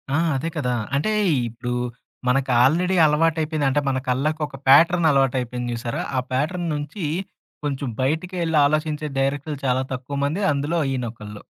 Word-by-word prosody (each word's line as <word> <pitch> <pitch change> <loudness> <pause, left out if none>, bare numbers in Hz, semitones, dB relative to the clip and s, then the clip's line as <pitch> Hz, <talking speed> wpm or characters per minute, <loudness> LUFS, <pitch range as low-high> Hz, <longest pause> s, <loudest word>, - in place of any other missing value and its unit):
ఆ! - - +3 0.2
అదే 150 +5 -2
కదా! 125 -5 0 0.2
అంటే 150 +10 +1 0.4
ఇప్పుడు 120 +2 -6 0.6
మనకి 130 +1 +2
ఆల్‌రెడి 175 +8 +3
అలవాటయిపోయిన 155 0 +1
అంటే 145 +2 +1
మన 130 - 0
కళ్ళకు 150 +5 0
ఒక 135 - -11
ప్యాటర్న్ 165 +5 +6
అలవాటయిపోయింది 125 -3 0
జూసారా, 115 0 -3 0.2
ఆ - - +4
ప్యాటర్న్ 165 +7 -1
నుంచి 150 +6 -5 0.6
కొంచెం 140 -1 -2
బయటికెళ్లి 165 +3 0
ఆలోచించే 155 +1 0
డైరెక్టర్లు 145 +2 -1
చాలా 130 0 +2
తక్కువ 130 +2 -5
మంది 155 +7 -1
అందులో 145 +4 -1
ఈయనొకళ్ళు. 115 -5 -5
145 Hz, 140 wpm, -23 LUFS, 130-155 Hz, 0.6 s, ప్యాటర్న్